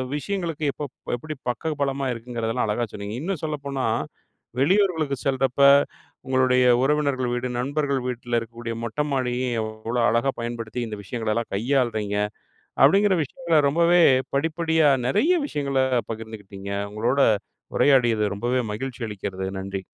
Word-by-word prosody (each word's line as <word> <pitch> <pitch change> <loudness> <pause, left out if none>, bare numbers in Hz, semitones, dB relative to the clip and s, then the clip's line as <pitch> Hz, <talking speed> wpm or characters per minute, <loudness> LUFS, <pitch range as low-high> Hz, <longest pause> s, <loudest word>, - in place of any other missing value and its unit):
விஷயங்களுக்கு 165 -2 -3
இப்ப - - -6 0.3
எப்படி 155 +5 -6 0.2
பக்க 155 +6 -2
பலமா 135 0 -1
இருக்குங்கிறதெல்லாம் 115 0 -2
அழகா 105 +3 0
சொன்னீங்க. 100 +2 -5
இன்னும் 180 +1 -3
சொல்லப்போனா, 140 -3 -3 0.7
வெளியூர்களுக்கு 160 -3 +2
செல்றப்ப 135 0 +1 0.7
உங்களுடைய 130 -1 +3 0.2
உறவினர்கள் 135 -3 +1
வீடு, 120 +1 -2
நண்பர்கள் 140 0 0
வீட்ல 120 -1 -2
இருக்கக்கூடிய 115 0 -6
மொட்ட 115 +6 -2
மாடியும் 125 -2 -1
எவ்வளோ 110 +2 -3
அழகா 120 +4 +2
பயன்படுத்தி 115 0 -4
இந்த 105 - -6
விஷயங்கள 110 0 -3
எல்லாம் 115 +1 -2
கையாளுறீங்க? 110 -3 0 0.7
அப்படிங்கிற 195 +7 +5
விஷயங்கள 165 +3 0
ரொம்பவே 170 +3 +4 0.3
படிப்படியா 160 +1 +2 0.2
நெறைய 315 - +3
விஷயங்கள 140 - -1 0.3
பகிர்ந்துக்கிட்டீங்க. 105 -3 -8 0.2
உங்களோட 120 +6 0 0.6
உரையாடியது 120 -6 +4
ரொம்பவே 120 +4 0
மகிழ்ச்சி 130 +2 -5
அளிக்கிறது. 95 -2 -4
நன்றி. 95 0 -5
130 Hz, 120 wpm, -24 LUFS, 115-150 Hz, 0.7 s, அப்படிங்கிற